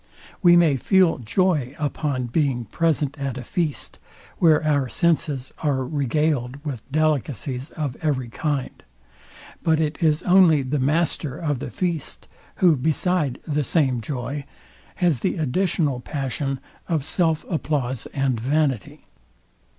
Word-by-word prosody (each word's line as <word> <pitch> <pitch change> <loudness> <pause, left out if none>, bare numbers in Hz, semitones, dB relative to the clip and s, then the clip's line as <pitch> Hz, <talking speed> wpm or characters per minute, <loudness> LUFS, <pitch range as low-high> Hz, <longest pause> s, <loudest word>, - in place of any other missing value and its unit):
We 175 -2 +7
may 160 -5 +4
feel 185 +4 +3
joy 145 - 0
upon 145 -3 -2
being 125 -1 0
present 150 - 0
at 135 -2 -3
a 125 - -5
feast, 155 +3 -3 0.4
where 160 -3 +4
our 145 -4 +1
senses 150 -6 0
are 135 -4 0
regard 140 -2 0
with 135 -7 -4
delicacies 140 -3 -1
of 145 -5 -2
every 140 -6 0
kind: 145 +1 -3 0.8
But 160 -1 +2
it 155 -1 -1
is 155 0 +2
only 180 -6 +5
the 135 +3 -1
master 150 0 +1
of 150 -6 -2
the - - -5
feast, 170 -5 -3 0.3
who, 175 -4 +4
beside 155 0 0
the 150 -1 0
same 130 -5 +1
joy, 135 +4 -4 0.5
has 170 -8 +2
the 185 - -1
additional 155 -2 0
passion 135 +1 -3 0.3
of 155 -5 0
self 160 -1 0
applause 140 - -2
and 135 -4 -1
vanity. 135 - -1
145 Hz, 130 wpm, -23 LUFS, 130-160 Hz, 0.8 s, We